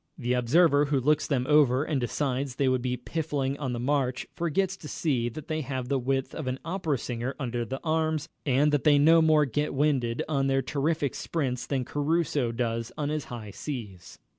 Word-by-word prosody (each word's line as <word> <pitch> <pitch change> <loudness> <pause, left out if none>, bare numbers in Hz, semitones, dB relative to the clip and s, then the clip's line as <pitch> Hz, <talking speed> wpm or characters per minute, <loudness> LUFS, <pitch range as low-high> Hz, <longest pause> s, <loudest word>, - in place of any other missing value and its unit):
The 125 -4 -1
observer 145 +4 +4
who 145 -1 +1
looks 150 +3 +2
them 130 -4 0
over 145 -3 +4
and 150 -4 -1
decides 130 +1 -2
they 140 0 +1
would 130 -1 +2
be 125 0 -1
piffling 140 -1 -2
on 135 -4 -2
the 120 - -3
march, 130 0 0
forgets 180 +3 0
to 155 - -10
see 130 -7 0
that 150 +5 -9
they 155 -1 -1
have 130 -3 -4
the 140 -1 +1
width 135 +1 -1
of 155 -5 -5
an 130 0 -1
opera 165 -4 -1
singer 120 +2 -4
under 120 -3 -2
the 135 +4 -5
arms, 160 -1 0 0.2
and 145 +2 +3
that 145 -2 +1
they 150 -2 +5
no 165 +3 +6
more 155 -2 +4
get 145 +3 -2
winded 130 -5 +1
on 140 -3 +1
their 135 0 +1
terrific 145 +1 -1
sprints 130 -7 -3
than 130 -3 -1
Caruso 145 -4 0
does 115 -1 -2
on 145 -2 -1
his 155 -1 -2
high 110 -4 -7
C's. 100 - -7
140 Hz, 200 wpm, -27 LUFS, 125-150 Hz, 0.2 s, no